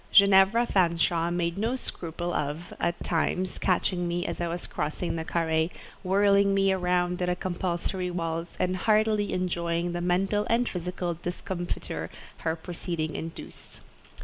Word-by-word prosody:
Ginevra 200 +3 +6
Fanshawe 170 -3 +2
made 175 +1 -1
no 230 +4 +1
scruple 175 -7 -4
of—at 160 +3 -2
times—catching 180 +1 0
me 175 0 -1
as - - -3
I 170 - 0
was 170 +1 -4
crossing 155 +4 -2
the 160 - -2
carré, 160 -1 +1 0.3
whirling 200 +1 +4
me 195 -1 +4
round 180 -1 +1
in 180 - +1
a 180 - +1
compulsory 180 0 -2
waltz, 165 -1 -3
and 185 0 +1
heartily 215 +1 +2
enjoying 170 -1 -1
the 175 0 -3
mental 195 +4 +1
and 235 +1 +3
physical 180 0 -3
discomfiture 175 +1 -4 0.3
her 160 -1 -1
proceeding 165 -2 -4
induced. 165 0 -8
175 Hz, 135 wpm, -28 LUFS, 170-190 Hz, 0.3 s, Ginevra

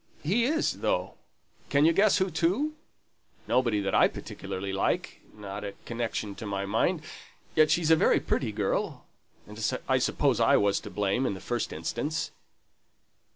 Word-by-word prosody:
He 210 +10 +2
is 315 +5 0
though. - - 0 0.6
Can 145 +1 +4
you 165 - +5
guess 200 +3 +4
who 190 -1 0
to? 195 - +1 0.7
Nobody 120 -4 +2
that 95 -1 -2
I - - +6
particularly 95 +1 -6
like 95 - -1 0.2
not 100 0 -6
a 100 -1 -6
connection 115 -3 -3
to 110 - -6
my 100 -1 -2
mind 150 - 0 0.5
yet 155 -1 +5
she's 165 -2 +2
a - - +9
very - - +3
pretty 120 -5 -1
girl; 105 -2 -2 0.4
and 105 +1 -3
I - - +3
suppose - - +1
I - - +5
was 100 -1 +2
to - - -9
blame 105 +5 0
in 100 - -2
the - - -8
first 120 +4 -2
instance." 120 - -3
120 Hz, 160 wpm, -28 LUFS, 100-165 Hz, 0.7 s, a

